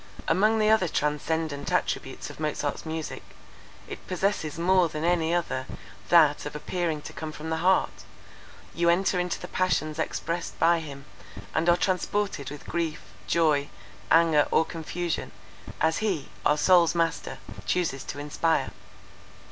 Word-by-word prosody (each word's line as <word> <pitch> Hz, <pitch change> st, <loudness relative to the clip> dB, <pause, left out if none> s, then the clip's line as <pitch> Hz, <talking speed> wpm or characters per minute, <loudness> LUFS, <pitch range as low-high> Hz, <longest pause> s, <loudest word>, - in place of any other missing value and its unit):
Among 215 Hz, +3 st, +3 dB
the 215 Hz, 0 st, +3 dB
other 220 Hz, -5 st, +4 dB
transcendant 150 Hz, 0 st, -1 dB
attributes -, -, -2 dB
of -, -, -14 dB
Mozart's 150 Hz, 0 st, -2 dB
music, 160 Hz, 0 st, -4 dB, 0.7 s
it -, -, -9 dB
possesses 185 Hz, -4 st, -1 dB
more 180 Hz, 0 st, +3 dB
than 155 Hz, 0 st, -5 dB
any 170 Hz, -1 st, +2 dB
other 170 Hz, -7 st, -1 dB, 0.4 s
that 155 Hz, -4 st, +5 dB
of 150 Hz, -, -8 dB
appearing 160 Hz, -1 st, -2 dB
to -, -, -8 dB
come 155 Hz, -1 st, -5 dB
from 155 Hz, +1 st, -7 dB
the 160 Hz, -, 0 dB
heart; 185 Hz, +3 st, +1 dB, 0.7 s
you 170 Hz, 0 st, +2 dB
enter 180 Hz, +1 st, +2 dB
into 180 Hz, 0 st, -1 dB
the 180 Hz, -, -7 dB
passions 160 Hz, -4 st, 0 dB
expressed 170 Hz, +2 st, -3 dB
by 170 Hz, +1 st, +4 dB
him, 140 Hz, -3 st, -9 dB, 0.5 s
and 165 Hz, +2 st, +2 dB
are 175 Hz, -, +5 dB
transported 190 Hz, -5 st, -1 dB
with 145 Hz, 0 st, -9 dB
grief, 165 Hz, -8 st, -3 dB
joy, 150 Hz, +2 st, +2 dB, 0.4 s
anger, 160 Hz, -3 st, +5 dB
or 160 Hz, -, +3 dB
confusion, 170 Hz, +1 st, -4 dB, 0.5 s
as 160 Hz, 0 st, +2 dB
he, 190 Hz, -10 st, -1 dB, 0.2 s
our 150 Hz, -, +3 dB
soul's 175 Hz, +1 st, +5 dB
master, 165 Hz, -1 st, -1 dB, 0.3 s
chooses 160 Hz, -7 st, 0 dB
to -, -, -6 dB
inspire. 150 Hz, +3 st, 0 dB
165 Hz, 145 wpm, -27 LUFS, 150-175 Hz, 0.7 s, that